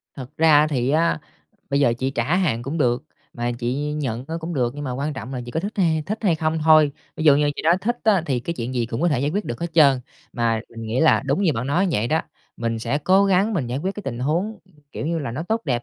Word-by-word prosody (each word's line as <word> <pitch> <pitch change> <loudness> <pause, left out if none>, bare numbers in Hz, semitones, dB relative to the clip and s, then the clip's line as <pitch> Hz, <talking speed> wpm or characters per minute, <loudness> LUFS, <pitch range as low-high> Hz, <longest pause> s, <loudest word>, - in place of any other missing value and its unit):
Thật 130 -2 -8
ra 155 -2 +5
thì 130 -4 -1
á, 160 +2 +2 0.5
bây 140 +1 +2
giờ 120 -4 +4
chị 130 +1 -1
trả 135 +7 0
hàng 150 -11 0
cũng 140 +6 -4
được 125 -4 +1 0.3
mà 120 0 -2
chị 135 +5 -2
nhận 130 -5 -3
á 165 - -4
cũng 165 +1 -5
được, 120 -4 0
nhưng 145 0 -6
mà 130 - -3
quan 140 +4 -2
trọng 130 0 -7
là 125 - -3
chị - - -6
có 160 - -2
thích 205 +4 -4
hay 165 -5 +2
thích 215 +2 -3
hay 180 -6 +3
không 155 0 -1
thôi. 155 -2 +6 0.2
Ví 160 - -3
dụ 145 -2 +7
như 145 0 +2
chị - - -4
nói 170 +3 +4
thích 240 +3 -1
á, 205 -6 +4
thì 130 -4 0
cái 170 +7 -4
chuyện 125 -2 -4
gì 120 -2 0
cũng 115 +1 -4
có 175 - +4
thể 135 -5 +1
giải 145 +2 0
quyết 205 +4 -2
được 120 - -5
hết 170 -1 -4
trơn. 140 -5 +5 0.3
Mà 115 -2 0
mình 115 -1 -9
nghĩ 115 +4 -1
là 160 - +4
đúng 140 +8 +1
như 170 -6 +3
bạn 115 +3 -3
nói 175 +8 +2
vậy 115 -7 0
đó, 160 +1 +2 0.4
mình 115 -1 -2
sẽ 120 +6 -1
cố 190 +6 +4
gắng 195 +3 +2
mình 150 -10 -1
giải 125 +3 -3
quyết 190 +6 -3
cái 210 - -7
tình 120 -9 -5
huống, 175 - -1 0.3
kiểu - - -4
như 165 0 -1
là, 140 -6 -4
nó 130 +7 -4
tốt 220 +6 -1
đẹp 120 -3 -1
145 Hz, 285 wpm, -22 LUFS, 125-170 Hz, 0.5 s, dụ